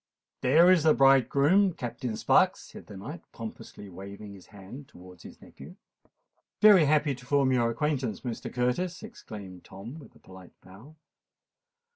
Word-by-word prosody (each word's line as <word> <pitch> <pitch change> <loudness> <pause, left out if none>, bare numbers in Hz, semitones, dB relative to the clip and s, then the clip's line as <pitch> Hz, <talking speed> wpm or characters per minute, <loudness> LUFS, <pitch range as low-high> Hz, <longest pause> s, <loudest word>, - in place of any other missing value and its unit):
"There 160 +8 +5
is 185 -3 +4
the 155 0 +3
bridegroom, 140 - +3
Captain 120 -4 -6
Sparks," - - +2
said - - -14
the 105 - -11
knight, 135 - -9
pompously 110 -2 -10
waving 100 +2 -10
his 95 -2 -15
hand 105 +7 -12
towards 90 0 -16
his - - -13
nephew. - - -14 0.8
"Very 205 -6 +6
happy 150 0 +1
to 125 0 -13
form 140 -1 +2
your 120 -2 +1
acquaintance, 125 -4 -2
Mr. 120 -3 -6
Curtis," 165 - -2
exclaimed 100 - -11
Tom, 110 +11 -11
with 135 - -16
a - - -20
polite 95 -1 -16
bow. 110 +12 -16
125 Hz, 150 wpm, -27 LUFS, 100-150 Hz, 0.8 s, Very